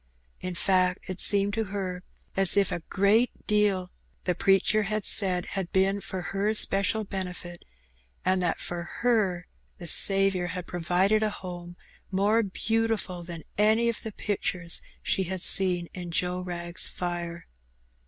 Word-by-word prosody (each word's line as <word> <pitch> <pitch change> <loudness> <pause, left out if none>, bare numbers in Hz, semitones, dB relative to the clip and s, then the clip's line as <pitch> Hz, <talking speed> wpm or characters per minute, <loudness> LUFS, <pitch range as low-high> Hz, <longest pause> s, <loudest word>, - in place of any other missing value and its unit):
In 185 -1 -5
fact, 185 0 +1
it 185 -1 -3
seemed 200 0 +3
to 225 +1 -1
her 190 -2 -5 0.3
as 195 0 +4
if 200 -2 +3
a - - -2
great 205 +5 +1
deal 205 -4 +1 0.3
the 180 - 0
preacher 195 +4 +3
had 215 0 -3
said 185 -3 +3
had 190 -3 -4
been 195 +1 +1
for 190 -1 -6
her 205 +2 0
special 200 +2 +4
benefit, 180 -3 -6 0.6
and 185 0 +2
thaft 175 -2 -1
for 175 -1 -3 0.2
her 210 -7 +1 0.3
the 175 - -9
Saviour 195 +1 +4
had 180 0 -5
provided 180 +5 +1
a 215 - +1
home 175 -3 -8 0.3
more 205 +4 +2
beautiful 220 -2 -2
thaj; 170 -2 -8 0.2
any 220 +3 +3
of 235 - -4
the 220 - -6
pictures 180 -4 -1 0.2
she 190 - 0
had 185 0 -5
seen 180 -3 +4
in 180 -1 -7
Joe 180 +2 -1
Wrag's 175 -1 -2
fire. 170 -1 -5
190 Hz, 150 wpm, -27 LUFS, 180-205 Hz, 0.6 s, as